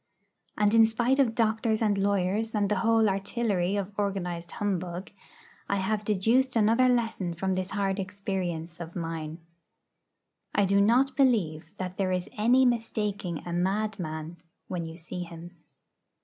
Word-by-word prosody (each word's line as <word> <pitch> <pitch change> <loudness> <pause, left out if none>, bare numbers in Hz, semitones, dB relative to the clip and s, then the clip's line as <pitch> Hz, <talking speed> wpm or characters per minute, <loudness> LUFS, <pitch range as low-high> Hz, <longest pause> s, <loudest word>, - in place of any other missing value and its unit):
And 210 0 +3
in 225 -1 +7
spite 240 +4 +1
of 235 -5 +3
doctors 220 -1 +1
and 210 -3 +2
lawyers 200 +3 0
and 205 -2 +1
the 210 - +2
whole 225 +1 +3
artillery 195 -1 0
of 200 0 -3
organised 180 -4 -2
Humbug, 185 -2 -3 0.6
I 200 - +2
have 205 +2 -1
deduced 225 +6 +2
another 230 +3 +4
lesson 225 -8 0
from 190 +3 -1
this 185 0 -2
hard 195 -1 -1
experience 185 -4 -4
of 170 -1 -8
mine: 165 -1 -5 1.1
I 200 - +4
do 200 +1 +3
not 255 +6 +3
believe 205 - +2
that 185 0 -5
there 190 -2 0
is 180 -1 -1
any 245 +5 +4
mistaking 210 -7 -1
a 175 - -4
madman 175 -4 -2 0.3
when 170 -3 -3
you 160 0 -9
see 175 +1 -7
him. 170 0 -8
200 Hz, 150 wpm, -28 LUFS, 175-220 Hz, 1.1 s, in